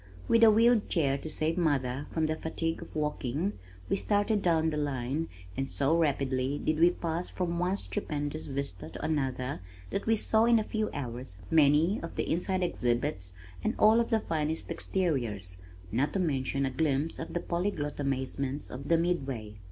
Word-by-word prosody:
With 230 0 +5
a 225 - +10
wheeled 225 +1 +4
chair 140 -6 +2
to 155 - -6
save 160 +3 0
mother 140 -4 0
from 160 -1 +1
the 155 0 0
fatigue 165 +1 -2
of 170 - -11
walking 150 - -1 0.3
we - - +1
started 205 +1 +1
down 160 -3 +2
the 150 - -2
line 145 +2 -1 0.3
and 135 0 -2
so 140 +3 +2
rapidly 140 -4 +1
did 155 +1 0
we 170 +1 +7
pass 170 0 -2
from 170 -2 -2
one 180 +2 +1
stupendous 155 -7 -3
vista 135 - -4
to 85 - -6
another 135 -3 -1 0.3
that 200 - -2
we 225 - +5
saw 220 +1 +3
in 235 0 +5
a 220 - +1
few 215 0 -1
hours 125 -7 -5
many 155 +6 +4
of 165 - -7
the - - -1
inside 185 +2 0
exhibits 120 - -1 0.3
and 220 - 0
all 220 +2 +6
of 235 - +1
the 220 -1 +2
finest 160 -1 -2
exteriors 120 - -1 0.4
not 130 +7 +1
to 195 - 0
mention 140 -5 0
a 135 - -1
glimpse 150 +2 0
of 165 - -6
the - - +2
polyglot 170 -5 -2
amazements 135 0 -2
of 135 +3 -7
the 165 - +4
Midway. 135 -11 -1
155 Hz, 180 wpm, -30 LUFS, 135-175 Hz, 0.4 s, a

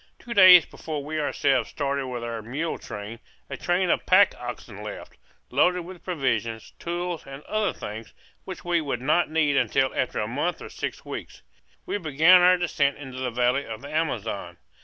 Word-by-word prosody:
Two 240 - -7
days 185 -5 +9
before 150 -3 -6
we 155 +1 -3
ourselves 135 -3 +1
started 140 -2 -2
with 125 -2 -5
our 115 -1 -4
mule 140 +9 -3
train, 105 +3 -8 0.3
a - - -2
train 175 0 +1
of - - +1
pack 190 +2 +6
oxen 120 -4 -7
left, 105 0 -8 0.4
loaded 180 +7 +3
with 180 +1 -11
provisions, 115 - -2
tools, 175 -1 -4
and 135 +2 -9
other 215 -2 0
things, 110 +2 -8 0.3
which 185 -2 -8
we 175 -1 +1
would 145 -3 -3
not 150 +7 +2
need 155 -2 +2
until, 130 -1 +2
after 130 - -1
a 105 - -1
month 145 +9 -2
or - - -9
six - - -6
weeks, - - -8 0.4
we 205 - -2
began 165 +3 +6
our 180 +1 +6
descent 145 -5 0
into 130 -3 -8
the 130 -1 -1
valley 125 +3 +1
of 110 -2 -7
the 140 - -8
Amazon. 110 - -2
145 Hz, 180 wpm, -25 LUFS, 120-175 Hz, 0.4 s, days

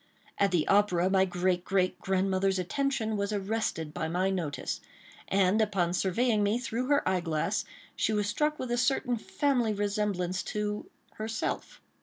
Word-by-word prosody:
At 200 - +4
the 175 -5 +1
opera, 190 -3 +3
my 190 -1 +4
great, 180 -1 0
great, 185 -1 +1
grandmother's 190 0 +1
attention 220 +3 -1
was 200 +1 -1
arrested 200 -6 -2
by - - -2
my 180 +4 +1
notice; 155 -8 -3 0.5
and, 195 +2 +3
upon 190 -5 +1
surveying 210 +5 +2
me 205 +3 +2
through 250 0 -3
her 285 0 +2
eye 185 - +2
glass, 160 -3 -1 0.3
she - - +1
was 210 -1 +1
struck 300 +8 0
with 255 -2 -4
a 240 - +1
certain 250 0 +1
family 245 -1 0
resemblance 200 -3 -1
to 210 0 -3 0.3
herself. 220 +1 -3
200 Hz, 155 wpm, -29 LUFS, 185-220 Hz, 0.5 s, At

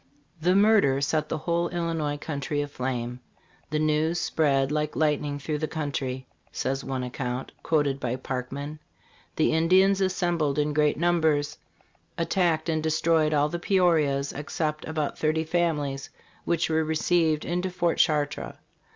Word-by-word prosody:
The 180 +3 +3
murder 200 -10 +4
set 155 +2 0
the 160 - -1
whole 170 +2 0
Illinois 165 -4 -2
country 145 0 -3
aflame. 125 -3 -4 0.5
"The 155 - -1
news 155 +2 +1
spread 135 -3 +1
like 150 0 -1
lightning 150 -2 0
through 150 +1 -3
the 155 - -1
country," 135 -4 -3 0.3
says 135 +1 -2
one 130 -1 -3
account, 125 0 -4
quoted 145 -4 +1
by 125 -2 -2
Parkman.* 135 +4 -5 0.6
"The 155 - +2
Indians 190 +4 +4
assembled 175 -6 0
in 150 0 +1
great 150 0 +2
numbers, 160 -3 +1 0.6
attacked 170 -1 +1
and 160 -1 0
destroyed 160 0 +2
all 150 0 +2
the 175 - -4
Peorias, 160 -7 +2
except 150 +1 -3
about 155 -2 -2
thirty 155 +1 +1
families, 155 -5 -1 0.4
which 170 -1 +1
were 160 0 +1
received 160 0 +1
into 180 +2 -1
fortChartres." 160 -4 0
155 Hz, 135 wpm, -26 LUFS, 145-165 Hz, 0.6 s, murder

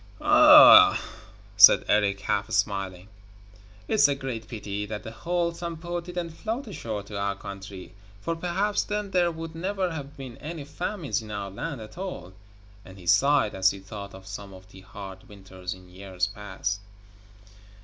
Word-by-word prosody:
'Ah!' - - +8 0.6
said - - +8
Erik, 100 -1 +2
half 100 +1 -1
smiling, 95 -4 -2 0.8
'it's 215 -8 +4
a 140 - 0
great 125 -5 -6
pity 105 -2 -5
that 105 -1 -6
the 110 - -7
whole 170 +7 -2
Sampo 170 0 -5
didn't 175 -1 -5
float 225 - -4
ashore 110 - -5
to 100 0 -7
our 100 0 -1
country, 100 -1 -9 0.3
for 165 +11 -3
perhaps 185 +5 -1
then 210 -1 -4
there 180 -2 +3
would 165 -1 -7
never 185 +2 -2
have 145 -2 -8
been 130 -3 -9
any 155 0 -7
famines 165 - -3
in 110 - -11
our 100 -2 -5
land 140 +5 -5
at 110 +10 -11
all,' 135 - -6 0.5
and 95 0 -14
he 90 - -13
sighed 135 +3 +3
as 95 0 +3
he 100 - -5
thought 100 +1 -9
of 95 0 -13
some 100 0 -8
of 95 0 -15
the 95 - -13
hard 95 0 -11
winters 95 -2 -9
in 95 0 -17
years 90 0 -3
past. 100 0 -4
110 Hz, 165 wpm, -26 LUFS, -, 0.8 s, Ah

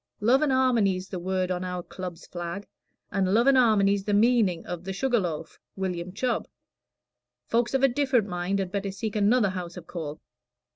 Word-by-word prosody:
Love 240 +6 +4
an' 305 - +2
'armony's 225 -8 +2
the 185 - -4
word 185 +1 -1
on 180 0 -2
our 180 -1 -4
Club's 180 -2 -8
flag, 175 +3 -6 0.5
an' 195 -1 +1
love 235 +3 +4
an' 275 - +6
'armony's 200 -5 +4
the 205 - +1
meaning 215 -6 +3
of 175 -1 -5
'The 190 +1 -4
Sugar 245 +4 +1
Loaf, 165 -4 -4 0.2
William 185 -2 -3
Chubb.' 235 +5 -1 1.0
Folks 235 +2 +1
of 270 - +1
a - - +8
different 260 -4 +1
mind 180 +1 -1
had 190 -2 -2
better 200 0 -2
seek 200 +2 -4
another 210 +1 +3
house 180 -1 -6
of 175 - -9
call." 155 -4 -6
195 Hz, 185 wpm, -27 LUFS, 180-235 Hz, 1.0 s, a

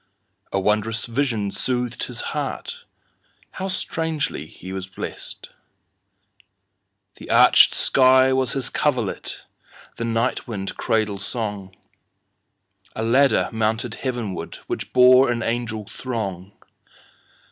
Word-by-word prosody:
A 95 - +1
wondrous 105 +3 0
vision 115 -5 -1
soothed 125 +2 -1
his - - -5
heartHow 190 +1 -7
strangely 160 -5 -2 0.2
was 95 -1 -4
he - - -27
blessed! - - -7 1.7
The - - -11
arched - - +6
sky 130 0 +5
was 130 -2 +1
his 135 -2 -1
coverlet, 125 -9 -1 0.6
The 115 - -2
night 115 +3 -1
wind 100 -4 -4
cradle 110 -3 0
song;A 100 -3 -4 1.3
ladder 130 +5 +4
mounted 110 +1 -1
heavenwardWhich 120 -7 -4
bore 125 +1 +7
an 115 -1 -2
angel 115 -2 -2
throng. 100 -7 -5
115 Hz, 95 wpm, -23 LUFS, 105-130 Hz, 1.7 s, bore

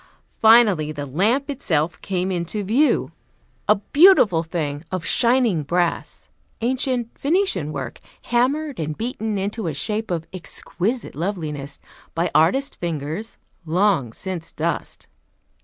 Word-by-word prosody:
Finally 220 -9 +5
the 145 -2 -5
lamp 210 - +1
itself 175 - -1
came 185 0 -1
into 180 +4 -2
view, 250 +10 +2 0.6
a 210 - +7
beautiful 220 - +5
thing 155 -3 -3
of 185 -2 -3
shining 235 -8 +3
brass; 170 +4 -1 0.3
ancient 250 -1 -1
Venetian 285 - +1
work, 135 -5 -5 0.2
hammered 275 +4 0
and 155 -1 -3
beaten 220 -2 -3
into 200 +1 -2
a 155 - -2
shape 215 +7 -1
of 165 -2 -2
exquisite 190 +5 -3
loveliness 150 -5 -4 0.4
by 170 +1 0
artist 270 - +2
fingers, 165 +5 -3 0.3
long 170 - +1
since 175 +4 -5
dust. 165 +2 -3
185 Hz, 120 wpm, -22 LUFS, 160-235 Hz, 0.6 s, a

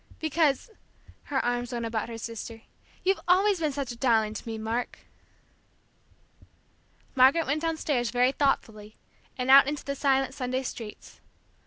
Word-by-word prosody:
Because," 315 - 0 0.5
her 270 -2 -1
arms 245 0 -1
went 235 -1 -3
about 225 0 -3
her 230 - -6
sister, 230 0 -7 0.4
"you've 385 +1 +2
always 380 +2 +4
been 310 -2 0
such 275 -3 -4
a - - -7
darling 225 -4 +2
to 220 - -8
me, 225 -1 -4
Mark!" 225 +3 -3 2.1
Margaret 270 +5 +5
went 295 +3 -1
downstairs 305 -7 -1
very 250 +2 +2
thoughtfully, 220 -7 -1 0.4
and 255 +1 +1
out 275 0 +9
into 290 -1 -4
the 280 - -2
silent 270 -1 +1
Sunday 255 0 -2
streets. 225 -4 -8
260 Hz, 145 wpm, -27 LUFS, 230-290 Hz, 2.1 s, out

